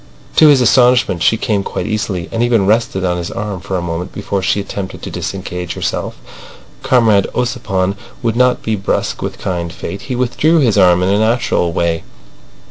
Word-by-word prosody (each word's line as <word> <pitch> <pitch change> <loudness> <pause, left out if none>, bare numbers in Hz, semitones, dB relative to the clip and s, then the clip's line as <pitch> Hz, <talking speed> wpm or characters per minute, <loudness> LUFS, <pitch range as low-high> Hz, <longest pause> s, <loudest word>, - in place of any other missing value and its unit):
To 155 - +8
his 140 -3 +6
astonishment 125 -7 +3
she 110 - +3
came 105 -2 0
quite - - -4
easily, 100 -5 -2
and 115 - -1
even 120 -4 +2
rested 105 -3 +1
on 90 -1 0
his 85 -1 -4
arm 105 -4 -4
for 95 +1 -3
a 90 - -3
moment 85 +1 -4
before 100 -1 -3
she 95 +2 +1
attempted 100 -1 -6
to - - -5
disengage 90 -2 -5
herself. - - -3 0.6
Comrade 110 -6 +3
Ossipon 100 -6 -1 0.3
would 115 -1 0
not 125 +1 +2
be 110 - 0
brusque 100 -1 -2
with - - -4
kind 85 -2 -3
fate. 100 +3 -7
He 125 - -1
withdrew 130 +7 +2
his 125 -9 +3
arm 90 -3 +4
in 90 - +1
a 100 +1 +2
natural 110 -6 +1
way. 85 -1 0
100 Hz, 185 wpm, -16 LUFS, 90-120 Hz, 0.6 s, To